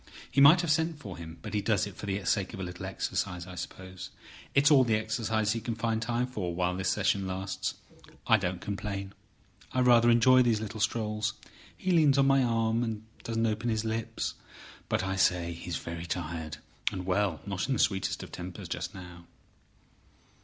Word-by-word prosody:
He 140 - +3
might 155 +6 +8
have 170 -3 0
sent 160 0 +1
for 100 -12 -8
him; 80 -1 -9
but - - -6
he 105 - +1
does 105 -1 +2
it 100 -3 -8
for 105 - -7
the 100 -1 -2
sake 95 +3 0
of - - -9
a - - -3
little 90 0 -6
exercise, 90 -3 -2
I 90 - -9
suppose. 95 +1 -7 0.5
It's 140 +3 +5
all 135 -3 +7
the 115 -3 +2
exercise 110 0 0
he 115 0 -1
can 115 +1 -3
find 115 -1 -1
time 120 +2 0
for 100 -9 -4
while 90 0 0
this 95 0 -1
session 100 -1 +1
lasts. 95 +1 -3 0.5
I 110 - +6
don't 90 -3 -3
complain; 100 -1 -4 0.6
I 130 - +2
rather 120 -1 +6
enjoy 130 +2 +6
these 115 -3 +3
little 110 0 -6
strolls. 110 0 0 0.4
He 185 - -1
leans 155 -5 +5
on 135 - +5
my 135 0 +5
arm, 115 -1 +1
and 110 -2 -3 0.2
doesn't 115 0 0
open 110 +2 0
his 110 -1 0
lips. 110 0 -2 0.6
But, - - +1
I 95 0 -2
say, 90 -2 +2
he's 85 0 -4
very 85 0 -6
tired, 80 -2 -4 0.3
and—well—not 95 0 -1
in 135 - +1
the 120 - -1
sweetest 95 -2 +1
of - - -10
tempers 90 0 -7
just - - -4
now." 90 -2 -11
105 Hz, 190 wpm, -29 LUFS, 95-115 Hz, 0.6 s, might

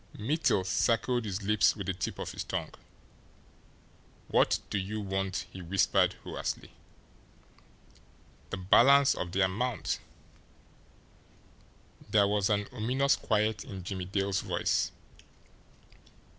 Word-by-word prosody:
Mittel 120 - +1
circled 120 +4 +1
his 100 0 -4
lips 105 0 +3
with 100 -3 -6
the 95 - -1
tip 90 - -4
of - - -5
his - - -5
tongue. - - -4 1.6
"What - - +3
do 100 - 0
you 105 +3 -4
want?" 95 -1 -2
he 95 - -8
whispered 90 +2 +2
hoarsely. - - -5 1.8
"The - - -4
balance 135 +9 +5
of 85 - -4
the 95 - 0
amount." 110 +6 -1 2.1
There 100 -2 +4
was 105 0 +1
an 105 -1 +1
ominous 130 +5 +1
quiet 110 -2 0
in 95 -2 -8
Jimmie 95 0 -4
Dale's 95 +1 -1
voice. - - 0
100 Hz, 115 wpm, -30 LUFS, 95-110 Hz, 2.1 s, balance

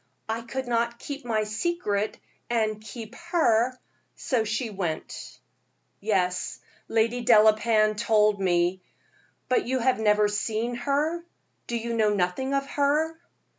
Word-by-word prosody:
I 225 +1 -2
could 260 +2 -5
not 235 0 0
keep 280 +1 -7
my 220 -3 +1
secret 215 - -1 0.3
and 215 -3 0
keep 220 +1 -9
her, 255 -9 +1 0.4
so 245 -5 0
she 220 +2 -2
went." 175 -6 -5 0.6
"Yes, 185 -4 -1 0.3
Lady 230 +2 +1
Delapain 215 -1 +5
told 210 -2 +2
me; 180 0 +1 0.7
but 255 - +1
have 260 0 +2
you - - -3
never 210 0 +4
seen 220 +3 -1
her? 290 +7 -1 0.4
Do 235 - -1
you 235 +1 -3
know 215 -2 +2
nothing 200 +9 0
of 275 0 0
her?" 295 +3 +1
225 Hz, 130 wpm, -26 LUFS, 210-255 Hz, 0.7 s, Delapain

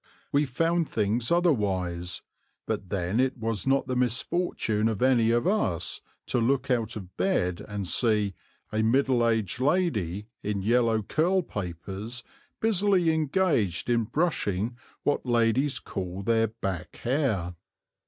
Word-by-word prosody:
We 145 +1 +2
found 165 +5 +1
things 110 +2 0
otherwise, 95 - 0 0.4
but 95 - -3
then 95 +3 -1
it 130 0 +1
was 115 -3 -2
not 135 +1 +3
the 130 - -2
misfortune 125 -3 0
of 110 -3 -2
any 120 -4 +4
of 120 0 +2
us 105 - 0 0.2
to - - 0
look 130 +3 +1
out 115 -2 0
of 95 -4 -9
bed 90 - 0
and 100 -3 -4
see 105 -2 +2 0.4
"a 110 - 0
middle 120 +1 +3
aged 110 -3 0
lady, 125 - 0 0.2
in 100 -2 -2
yellow 115 0 +2
curl 180 - +1
papers, 100 - -6 0.4
busily 195 -5 +3
engaged 150 - +1
in 115 -2 +2
brushing 120 - -1 0.3
what 145 - +1
ladies 120 +3 +2
call 95 +1 -5
their 115 +1 +3
back 95 -5 -5
hair." 115 - -1
115 Hz, 135 wpm, -27 LUFS, 100-140 Hz, 0.4 s, any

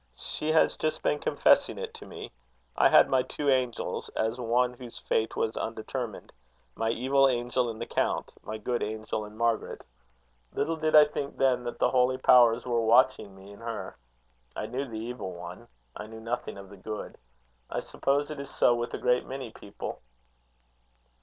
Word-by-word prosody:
She 155 - -3
has 160 - +4
just 155 - -2
been 150 - +1
confessing - - +3
it - - -5
to - - -11
me. - - -8 0.4
I - - +5
had - - +7
my 130 -1 +3
two 145 +3 -2
angels, 125 -3 -1
as 110 +3 -1
one 125 +1 +2
whose 120 -1 -9
fate 110 - -1
was 110 - -1
undetermined; 115 0 -5 0.4
my 115 0 -1
evil 135 +4 +3
angel 120 0 0
in 110 - -6
the 115 - -4
count - - -1
my 110 - -5
good 120 +3 -2
angel 110 0 -3
in 105 +1 -12
Margaret. 115 -1 -1 0.7
Little 165 - 0
did 155 0 +1
I 150 -1 +10
think 145 -1 -5
then 125 -2 +2
that 120 - -4
the - - +2
holy 130 0 +3
powers 120 -2 +5
were 120 -2 +1
watching 115 -3 +3
me 95 +1 -13
in 100 - -13
her. 115 -1 -5 0.6
I - - -3
knew 135 +4 -3
the 115 -3 -6
evil 110 -4 -5
one; 90 +6 -9 0.3
I - - -7
knew 110 0 -10
nothing 115 -1 -4
of 100 -1 -10
the 100 - -11
good. 105 +3 -7 0.5
I - - -2
suppose 145 +2 -1
it 150 - -6
is 140 - -6
so 120 - +3
with 120 0 -2
a - - -3
great 125 0 +1
many 130 -3 -6
people." 100 - -8
120 Hz, 185 wpm, -28 LUFS, 110-130 Hz, 0.7 s, I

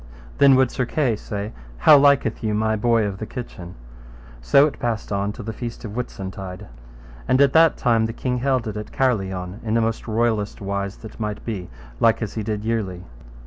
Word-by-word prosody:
Then 140 -1 +7
would 130 -1 +3
Sir 125 - -2
Kay 130 -7 +1
say, 105 0 -5 0.3
How 65 - +7
liketh 140 -5 +4
you 105 -1 0
my 110 +1 +1
boy 115 0 +2
of 100 -2 -4
the 110 - -5
kitchen? 90 -8 -8 0.7
So 140 - +5
it 150 - -4
passed 115 -4 -2
on 100 0 0
till 110 0 -9
the 110 - -4
feast 120 +1 -6
of 105 - -6
Whitsuntide. 95 -5 -6 0.6
And 130 - +3
at 140 -1 +5
that 160 -1 +5
time 115 -2 +2
the - - -4
king 125 +1 -2
held 130 -2 0
it 105 -1 -4
at 105 0 -7
Carlion 95 -6 -1
in 110 0 -1
the 115 - +3
most 115 0 -1
royallest 110 -2 0
wise 100 0 -3
that 110 - -11
might 105 -1 -4
be, 100 -6 -4 0.3
like 115 - +4
as 105 - -5
he 110 - -3
did 105 0 -3
yearly. 100 -6 -2
110 Hz, 200 wpm, -22 LUFS, 100-120 Hz, 0.7 s, Then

